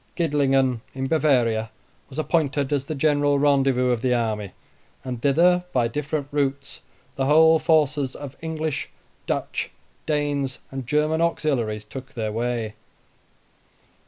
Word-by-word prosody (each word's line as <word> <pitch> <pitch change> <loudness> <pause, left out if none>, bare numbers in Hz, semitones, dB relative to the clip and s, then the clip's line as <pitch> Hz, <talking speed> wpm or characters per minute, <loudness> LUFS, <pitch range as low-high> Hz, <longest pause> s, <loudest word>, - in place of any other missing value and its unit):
Gidlingen, 135 -6 +2
in 135 0 -2
Bavaria, 125 -7 +2 0.4
was 135 - -11
appointed 150 -3 0
as 140 -2 0
the 155 - -4
general 145 0 +2
rendezvous 135 -3 +3
of 120 -2 0
the 125 -1 +2
army, 110 -4 -1 0.5
and 125 -3 -5
thither, 175 +6 +4
by 120 -2 +2
different 145 +3 -3
routes, 140 -1 -2 0.4
the 135 0 0
whole 160 +2 +6
forces 150 -4 +2
of 140 -2 -8
English, 160 -2 -3 0.4
Dutch, - - -2 0.4
Danes, 145 -3 -1
and 135 -3 -6
German 155 +3 +1
auxiliaries 120 -10 0
took 130 +5 -9
their 110 -2 -2
way. 115 -1 -2
140 Hz, 130 wpm, -24 LUFS, 125-150 Hz, 0.5 s, whole